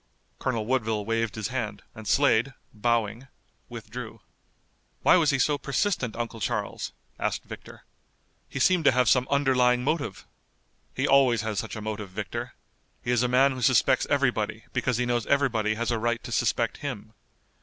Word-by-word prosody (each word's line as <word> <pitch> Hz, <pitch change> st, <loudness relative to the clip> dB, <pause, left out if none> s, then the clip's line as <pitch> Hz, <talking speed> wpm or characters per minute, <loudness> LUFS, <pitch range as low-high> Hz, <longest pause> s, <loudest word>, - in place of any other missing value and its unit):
Colonel 115 Hz, -4 st, -1 dB
Woodville 110 Hz, -4 st, 0 dB
waved 115 Hz, -1 st, -1 dB
his 110 Hz, +1 st, -3 dB
hand 110 Hz, -5 st, -4 dB
and 110 Hz, -2 st, -10 dB
Slade, 135 Hz, -1 st, +3 dB, 0.2 s
bowing, 115 Hz, +2 st, -1 dB, 0.4 s
withdrew. -, -, -8 dB, 0.8 s
"Why -, -, +6 dB
was 165 Hz, -5 st, +4 dB
he 140 Hz, -, +2 dB
so 145 Hz, +3 st, +1 dB
persistent, 140 Hz, -, -1 dB
Uncle 115 Hz, -1 st, -4 dB
Charles?" 110 Hz, -3 st, -3 dB, 0.3 s
asked -, -, -1 dB
Victor. -, -, -11 dB, 0.7 s
"He -, -, -7 dB
seemed 175 Hz, +5 st, +3 dB
to -, -, +7 dB
have 125 Hz, -1 st, +3 dB
some 125 Hz, +2 st, +4 dB
underlying 125 Hz, -3 st, +3 dB
motive." 145 Hz, +2 st, -2 dB, 0.7 s
"He -, -, 0 dB
always 130 Hz, -4 st, +4 dB
has 110 Hz, -3 st, -2 dB
such -, -, -5 dB
a 110 Hz, -, -6 dB
motive, 105 Hz, -2 st, -4 dB
Victor. 110 Hz, +5 st, -5 dB, 0.5 s
He 120 Hz, -, -1 dB
is 120 Hz, -2 st, +3 dB
a 125 Hz, -, +2 dB
man 130 Hz, +3 st, +4 dB
who 130 Hz, -1 st, -5 dB
suspects -, -, +3 dB
everybody -, -, 0 dB
because 125 Hz, -2 st, 0 dB
he 125 Hz, -, 0 dB
knows 120 Hz, -2 st, -1 dB
everybody 115 Hz, -7 st, +1 dB
has 120 Hz, +2 st, -1 dB
a 115 Hz, -, 0 dB
right 120 Hz, +1 st, -1 dB
to 120 Hz, -, -8 dB
suspect 115 Hz, 0 st, 0 dB
him. 110 Hz, -7 st, -6 dB
120 Hz, 165 wpm, -26 LUFS, 110-130 Hz, 0.8 s, to